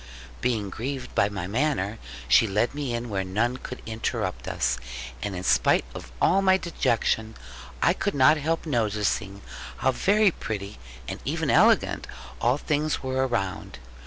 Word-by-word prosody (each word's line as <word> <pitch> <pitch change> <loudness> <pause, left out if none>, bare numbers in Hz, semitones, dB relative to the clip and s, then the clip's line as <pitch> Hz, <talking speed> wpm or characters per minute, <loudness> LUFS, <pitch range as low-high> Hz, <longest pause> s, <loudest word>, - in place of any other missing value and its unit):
Being 110 -5 0
grieved 130 +4 -4
at 100 +1 +3
my 95 -4 -4
manner, 115 -1 -1 0.3
she 90 - +5
led 105 +5 +1
me 140 -5 -3
in 120 +1 -3
where 100 -3 -2
none 110 +7 0
could 125 - -8
interrupt 110 - -3
us; - - 0 0.4
and 100 -2 -3
in 90 - -5
spite - - +3
of - - -9
all 195 +3 +4
my 190 -1 +5
dejection, 110 -10 0 0.5
I - - +5
could - - -2
not 140 +3 +6
help 160 +3 -1
noticing 105 -6 -1 0.3
how 130 - +2
very 200 - +3
pretty 105 -7 -6 0.3
and - - -5
even - - -1
elegant - - +4 0.3
all 125 +3 +3
things 150 0 -1
were 130 0 0
around. 95 - -3
120 Hz, 155 wpm, -26 LUFS, 100-140 Hz, 0.5 s, not